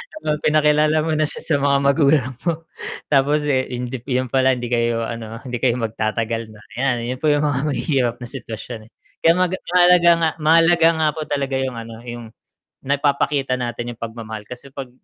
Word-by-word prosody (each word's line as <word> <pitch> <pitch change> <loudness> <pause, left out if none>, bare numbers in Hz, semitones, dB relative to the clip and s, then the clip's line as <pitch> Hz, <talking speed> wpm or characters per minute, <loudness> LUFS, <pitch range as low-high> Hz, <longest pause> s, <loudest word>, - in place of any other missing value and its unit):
Habang 150 - -2
pinakilala 150 0 +3
mo 160 - -1
na 155 0 +1
siya - - -1
sa 160 - +1
mga 140 0 +3
magulang 140 -3 +2 0.2
mo. 165 -1 -1 0.5
Tapos, 145 +2 +3
eh, 130 -1 +1
hindi 125 +1 -4
'yon 130 -2 -1
pala 130 0 +3
hindi 120 -1 -6
kayo, 115 -1 +1
ano, 115 -1 -6
hindi 125 -3 -4
kayo 120 -2 +2
magtatagal 115 0 -2
na. 105 - -15 0.2
'Yan, 125 -3 0
'yon 125 +1 -4
po 155 - 0
'yong 145 0 +2
mga 145 -3 0
mahihirap 130 -4 0
na - - -6
sitwasyon, 115 -3 -8
eh, - - -59 0.3
kaya 165 - +6
nga 185 - +4
ga 185 - -2
mahalaga 175 -1 +6
nga 160 - +3
mahalaga 165 +1 +5
nga 155 - +3
po 155 - -4
talaga 140 -2 -1
'yong, 130 -2 -2
ano, 115 0 -8
'yong 120 -1 -7 0.6
nagpapakita 140 -1 +1
natin 120 0 -4
'yong 115 - -27
pagmamahal. 110 -2 -6
Kasi 125 +3 -9
'pag 135 -3 -7
130 Hz, 190 wpm, -20 LUFS, 120-150 Hz, 0.6 s, kaya